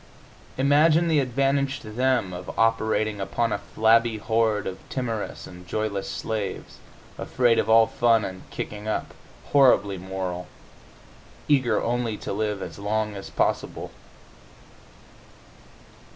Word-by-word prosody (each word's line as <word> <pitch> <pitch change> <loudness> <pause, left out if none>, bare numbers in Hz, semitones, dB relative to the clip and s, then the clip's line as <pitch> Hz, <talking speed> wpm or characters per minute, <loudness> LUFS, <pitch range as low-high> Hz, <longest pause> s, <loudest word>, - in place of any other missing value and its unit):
Imagine 150 +5 +4
the 155 -2 +4
advantage 135 +1 0
to 110 - -9
them 125 -5 +1
of 90 0 -8
operating 110 -2 +1
upon 115 +4 -1
a - - -2
flabby 110 +2 +2
horde 110 -1 +1
of 95 0 -5
timorous 115 -5 -4
and 90 0 -12
joyless 100 0 -2
slaves, 105 -4 -4 0.4
afraid 120 -2 +2
of - - -1
all 115 0 +7
fun 115 -1 +2
and 95 0 -8
kicking 105 0 -6
up, 110 - -2 0.4
horribly 100 -9 +4
moral, 95 -1 -5 1.0
eager 135 -5 +3
only 120 -2 -1
to - - -5
live 105 -1 -2
as - - -8
long 105 +1 -1
as 100 - -8
possible! - - -1
110 Hz, 125 wpm, -25 LUFS, 100-125 Hz, 1.0 s, all